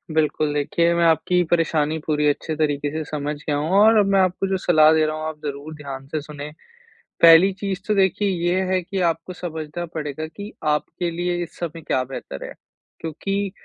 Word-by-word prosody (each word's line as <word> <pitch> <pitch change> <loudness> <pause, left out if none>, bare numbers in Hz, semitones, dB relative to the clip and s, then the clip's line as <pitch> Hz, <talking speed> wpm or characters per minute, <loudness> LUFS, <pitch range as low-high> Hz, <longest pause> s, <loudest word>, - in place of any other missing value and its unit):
बिल्कुल, 155 -1 +1
देखिए, 170 +4 +1
मैं 170 - +2
आपकी 175 +2 +3
परेशानी 160 -2 +1
पूरी 150 -1 +1
अच्छे 150 +2 -1
तरीके 145 -2 0
से 155 +1 -3
समझ 150 0 -3
गया 145 0 -2
हूँ 150 +2 -2
और 220 +2 +6
अब 205 - +4
मैं 195 - +4
आपको 185 +1 +1
जो 190 0 0
सलाह 155 -4 +5
दे 160 -1 +3
रहा 155 0 -2
हूँ, 155 - -5
आप 155 -1 -6
ज़रूर 145 +2 -5
ध्यान 135 -2 -8
से 155 +2 -3
सुनें। 150 0 -8 0.7
पहली 170 +3 +8
चीज़ 195 -1 -4
तो 210 - +2
देखिए 195 +1 +2 0.2
ये 180 +2 +2
है 185 0 +2
कि 190 +3 -4
आपको 165 +2 -5
समझना 160 -1 -5
पड़ेगा 155 -2 -5
कि, 205 +6 -9
आपके 155 +3 -1
लिए 175 +1 -2
इस 170 - -11
समय 165 -1 -5
क्या 130 -4 0
बेहतर 125 - -7
है, - - -8 0.5
क्योंकि 195 +5 -3
160 Hz, 200 wpm, -22 LUFS, 150-180 Hz, 0.7 s, पहली